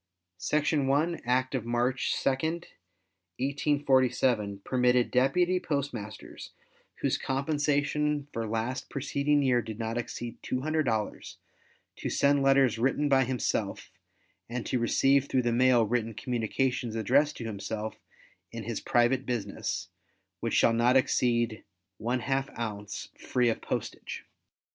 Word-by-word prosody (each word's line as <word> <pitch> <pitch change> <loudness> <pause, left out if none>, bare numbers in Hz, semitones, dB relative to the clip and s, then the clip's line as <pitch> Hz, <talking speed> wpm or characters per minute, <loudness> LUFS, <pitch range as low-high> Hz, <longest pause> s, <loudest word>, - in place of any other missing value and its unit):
Section 145 - +1
1, 155 +5 +1
Act 130 +2 +1
of 130 -4 -1
March 120 +2 0
2, - - 0
1847, 125 - -1
permitted 125 -1 +2
deputy 175 +9 +3
postmasters 140 - -5 0.5
whose - - +1
compensation 145 +1 0
for 115 -1 -2
last 115 +4 -3
preceding 140 +1 +1
year 125 -2 +3
did 110 -2 -7
not 115 +1 -2
exceed 120 0 -6
$200 130 -5 -1 0.6
to - - -3
send 140 0 +3
letters 135 -4 +4
written 135 +4 +1
by 135 -1 +4
himself, 125 -2 -2 0.6
and 120 0 -4
to 125 - 0
receive 135 +4 +3
through 130 -1 +2
the 120 - +1
mail 125 -1 +4
written 115 0 -1
communications 120 0 -1
addressed 135 +7 +2
to 115 - -6
himself 110 +1 -4 0.5
in 115 -1 -6
his 115 0 -4
private 120 +2 +2
business 115 -6 -3 0.5
which - - -1
shall 115 - +5
not 120 +3 +4
exceed 120 -3 +1 0.4
½ 130 +3 -1
ounce, 105 -3 -5
free 125 -1 +1
of 115 - -2
postage. - - -5
125 Hz, 120 wpm, -29 LUFS, 115-140 Hz, 0.6 s, shall